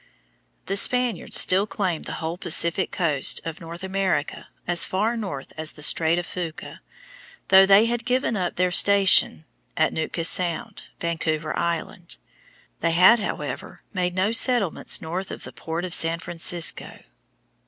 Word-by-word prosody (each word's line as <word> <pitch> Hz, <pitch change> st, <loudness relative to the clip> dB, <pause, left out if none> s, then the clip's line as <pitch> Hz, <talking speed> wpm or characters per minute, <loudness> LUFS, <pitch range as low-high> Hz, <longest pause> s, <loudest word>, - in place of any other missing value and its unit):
The 195 Hz, -, -1 dB
Spaniards 250 Hz, +2 st, +2 dB
still 195 Hz, +3 st, +2 dB
claimed 185 Hz, -6 st, -3 dB
the -, -, -6 dB
whole 165 Hz, +1 st, -3 dB
Pacific 170 Hz, +1 st, +1 dB
coast 155 Hz, -7 st, 0 dB
of 165 Hz, 0 st, -7 dB
North 170 Hz, +2 st, -9 dB
America 190 Hz, -6 st, -2 dB, 0.2 s
as 175 Hz, -1 st, +3 dB
far 215 Hz, +5 st, -1 dB
north 190 Hz, -12 st, -6 dB
as 155 Hz, 0 st, -3 dB
the 150 Hz, -, -5 dB
Strait 160 Hz, +2 st, +3 dB
of 175 Hz, -, -3 dB
Fuca, 170 Hz, -4 st, -7 dB, 0.7 s
though 190 Hz, 0 st, +7 dB
they 200 Hz, +3 st, +6 dB
had 235 Hz, 0 st, -2 dB
given 250 Hz, -1 st, 0 dB
up 180 Hz, -3 st, -2 dB
their 180 Hz, 0 st, 0 dB
station 195 Hz, -4 st, +4 dB, 0.3 s
at 160 Hz, -, +1 dB
Nootka 160 Hz, +1 st, -3 dB
Sound, 185 Hz, +6 st, 0 dB
Vancouver 160 Hz, -2 st, -3 dB
Island. 170 Hz, 0 st, -4 dB, 0.6 s
They 170 Hz, 0 st, 0 dB
had, 190 Hz, +8 st, +6 dB
however, 210 Hz, -, -6 dB
made 180 Hz, -2 st, -2 dB
no 190 Hz, +3 st, +1 dB
settlements 230 Hz, -6 st, 0 dB
north 175 Hz, +4 st, -5 dB
of -, -, -8 dB
the -, -, -10 dB
port 165 Hz, +2 st, -5 dB
of 180 Hz, -, -7 dB
San 165 Hz, 0 st, +1 dB
Francisco. 170 Hz, 0 st, -3 dB
180 Hz, 150 wpm, -23 LUFS, 165-195 Hz, 0.7 s, though